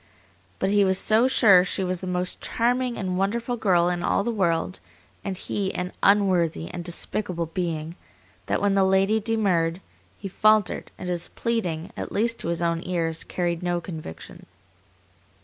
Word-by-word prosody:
But 195 - 0
he 205 0 +4
was 190 -1 +2
so 220 +5 +3
sure 200 -8 +6
she 190 +1 -2
was 185 -1 -2
the 185 - -5
most 180 0 -2
charming 245 +1 0
and 190 - -3
most 180 - -1
wonderful 235 +5 -1
girl 180 -6 +2
in 175 -1 -1
all 200 - +1
the 235 - -1
world, 185 -3 0 0.4
and 195 -2 -3
he 195 +1 -2
an 180 +1 -3
unworthy 185 -5 +2
and 175 - -6
despicable 175 0 -2
being, 165 -1 -4 0.5
that - - 0
when 200 -1 +3
the 195 0 +3
lady 190 +3 +3
demurred, 190 -7 +1 0.4
he 200 - -6
faltered, 215 +1 +2
and - - -7
his 175 -1 -1
pleading, 180 -8 -2
at - - -5
least 230 +2 0
to - - -4
his 170 0 -1
own 170 0 0
ears, 165 -3 -1
carried 175 -1 -2
no 175 -1 0
conviction. 160 - -9
185 Hz, 170 wpm, -25 LUFS, 170-205 Hz, 0.5 s, sure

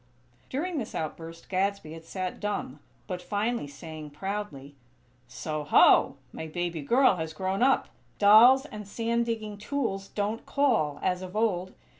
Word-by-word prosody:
During 315 +4 -2
this 225 - -6
outburst 165 +1 -6
Gadsby 195 -4 -1
had 165 0 -10
sat 185 +1 -4
dumb; 205 -9 -3 0.3
but 180 -3 -5
finally 210 0 -2
saying, 155 +1 -9
proudly: 150 -4 -5 0.5
"So, 155 +5 -4
ho! 145 - +5 0.2
My 160 - -6
baby 175 0 -3
girl 240 - +4
has 160 -1 -4
grown 190 +4 -2
up! 265 +1 +3 0.3
Dolls 235 +7 +7
and 210 -7 -9
sand 230 +2 -1
digging 215 -3 -4
tools 210 -5 -2
don't 210 +2 -3
call, 225 - +1
as 180 0 0
of 185 +1 -8
old. 190 -5 0
195 Hz, 145 wpm, -28 LUFS, 165-225 Hz, 0.5 s, Dolls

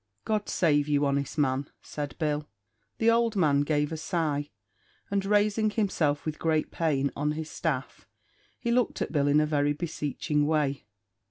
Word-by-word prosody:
"God 215 -1 -1
save 145 -4 +2
you, 145 -1 +2
honest 140 +1 -1
man!" 135 -1 +1
said 145 -2 -5
Bill. 150 -2 -1 0.5
The 230 0 +4
old 230 -1 +2
man 150 -7 +3
gave 150 0 0
a 160 - -3
sigh, 155 -3 -1 0.6
and 200 -1 +1
raising 210 +2 +2
himself 175 -9 0
with 155 -1 -3
great 160 -1 0
pain, 140 -4 0
on 150 +1 0
his 155 0 -5
staff, 140 -6 -3 0.5
he 235 - -2
looked 245 -1 +1
at - - -6
Bill 145 -3 +2
in 145 +1 +5
a 155 - +3
very 145 -1 +1
beseeching 150 -2 -1
way. 145 -6 0
150 Hz, 165 wpm, -28 LUFS, 145-175 Hz, 0.6 s, in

